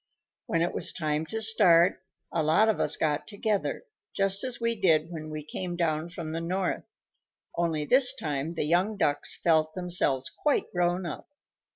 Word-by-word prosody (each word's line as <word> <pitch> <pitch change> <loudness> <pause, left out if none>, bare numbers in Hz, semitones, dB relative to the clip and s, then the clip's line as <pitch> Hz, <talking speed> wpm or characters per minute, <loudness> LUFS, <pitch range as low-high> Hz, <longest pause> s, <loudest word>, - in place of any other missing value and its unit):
When 165 0 +1
it 175 - -2
was - - 0
time 155 -1 -2
to 220 - -4
start, 180 -5 +4 0.3
a 165 - 0
lot 160 +8 +3
of 220 - 0
us 150 - +5
got 150 -1 -1
together, 210 - -2 0.3
just 195 0 0
as 255 -2 -2
we 230 0 0
did 165 -5 +2
when 155 -2 -7
we 155 -1 -6
came 175 +3 -5
down 160 -1 -1
from 170 -3 -7
the 165 +1 -3
North, 185 +2 -2 0.7
only 165 -3 -1
this 255 - +6
time 150 - -3
the 165 - -2
young 180 +7 +1
Ducks 145 -6 0
felt 155 -2 +1
themselves 175 -7 -1
quite 295 - -1
grown 175 0 0
up. 170 - -7
170 Hz, 175 wpm, -27 LUFS, 155-195 Hz, 0.7 s, this